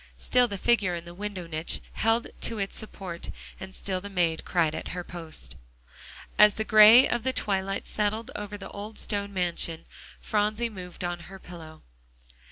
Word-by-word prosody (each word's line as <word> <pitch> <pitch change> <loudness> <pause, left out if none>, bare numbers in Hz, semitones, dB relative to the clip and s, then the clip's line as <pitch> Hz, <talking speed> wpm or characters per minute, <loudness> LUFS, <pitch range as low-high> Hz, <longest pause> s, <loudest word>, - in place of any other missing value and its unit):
Still 250 -1 +3
the 200 - -4
figure 205 -4 +2
in 170 0 -6
the 170 - -9
window 195 -1 -5
niche 160 0 -1
held 225 +1 +2 0.2
to 230 - 0
its 195 -1 -1
support, 190 -5 -5 0.3
and 190 0 -8
still 185 -2 -2
the 200 - -7
maid 170 -4 +1
cried 165 -4 +1
at 160 - -5
her 180 - -3
post. 160 - -7 0.8
As 210 0 +8
the 220 - -1
gray 215 +4 +9
of 240 - 0
the 260 +3 0
twilight 195 -5 -1
settled 215 +2 -1
over 210 0 -5
the 195 -1 -9
old 210 +2 -7
stone 200 -1 -1
mansion, 175 -3 -1 0.3
Phronsie 215 +2 0
moved 180 -4 -8
on 175 0 -2
her 195 - -9
pillow. 165 -4 -11
195 Hz, 175 wpm, -27 LUFS, 175-210 Hz, 0.8 s, gray